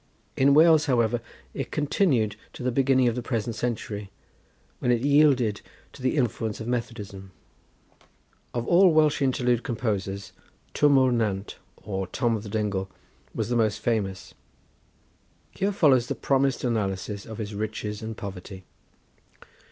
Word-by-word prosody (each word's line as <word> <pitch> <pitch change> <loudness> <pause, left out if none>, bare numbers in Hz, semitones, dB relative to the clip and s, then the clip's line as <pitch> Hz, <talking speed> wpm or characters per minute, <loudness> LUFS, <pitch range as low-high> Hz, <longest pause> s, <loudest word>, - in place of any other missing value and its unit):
In 140 +1 +4
Wales, 160 -1 +6
however, 120 -3 +2 0.3
it 135 - -4
continued 140 - +1 0.2
to - - -8
the 125 - +1
beginning 130 0 +3
of 120 - +2
the 125 - -3
present 115 -1 -2
century, 105 -3 -4 0.7
when - - -1
it 120 -2 +3
yielded 140 -6 +3 0.3
to 140 - -13
the 130 +4 0
influence 115 -4 -1
of 110 - -6
Methodism. 105 -6 -5 1.2
Of 120 -1 -3
all 180 +1 +6
Welsh 155 -2 +3
interlude 125 -3 +1
composers, 105 -6 -3 0.4
Twm 145 -2 +4
O'r 130 -1 +4
Nant, 105 -4 -2 0.2
or 95 -2 -4
Tom 120 +3 0
of 110 - -4
the 105 - -8
Dingle, 100 -3 -2 0.5
was - - -2
the 120 - 0
most 110 -2 +2
famous. 105 -5 -2 1.2
Here 200 +1 -1
follows 135 -11 +3
the - - -2
promised 135 -1 +1
analysis 100 -3 -2
of 110 - -8
his 105 -2 -5
"Riches 105 0 -4
and 110 0 -6
Poverty." 95 -2 -8
115 Hz, 145 wpm, -26 LUFS, 105-130 Hz, 1.2 s, Wales